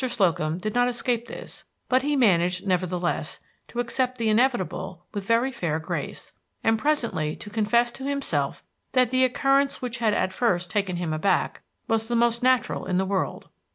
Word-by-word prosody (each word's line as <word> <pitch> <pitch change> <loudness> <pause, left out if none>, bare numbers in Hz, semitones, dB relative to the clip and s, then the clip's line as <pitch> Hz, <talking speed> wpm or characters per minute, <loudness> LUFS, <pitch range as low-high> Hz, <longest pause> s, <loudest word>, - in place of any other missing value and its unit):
Slocum 175 -10 +1
did 210 +3 -3
not 245 0 +3
escape 240 -1 -1
this, - - -8 0.2
but 255 +1 +3
he 290 +2 0
managed, 180 -7 +3
nevertheless, 180 -2 -1 0.3
to 240 - -6
accept 255 +1 0
the 225 -2 0
inevitable 215 - 0
with 200 -2 -4
very 235 +3 +3
fair 170 -10 -2
grace, 160 - -5 0.3
and 225 0 +3
presently 230 - 0
to 205 - -9
confess 235 +3 +2
to 265 - -8
himself 280 0 -1 0.3
that 255 -2 +3
the 260 0 +3
occurrence 275 +2 +2
which 245 -2 -4
had 220 -3 +2
at 185 0 0
first 180 -5 0
taken 200 -4 0
him 170 -2 -2
aback 155 +6 0 0.3
was 225 0 +1
the 240 - -1
most 235 0 +2
natural 255 0 +2
in 180 -1 +1
the 190 - +1
world. 190 -1 -2
225 Hz, 175 wpm, -25 LUFS, 185-250 Hz, 0.3 s, not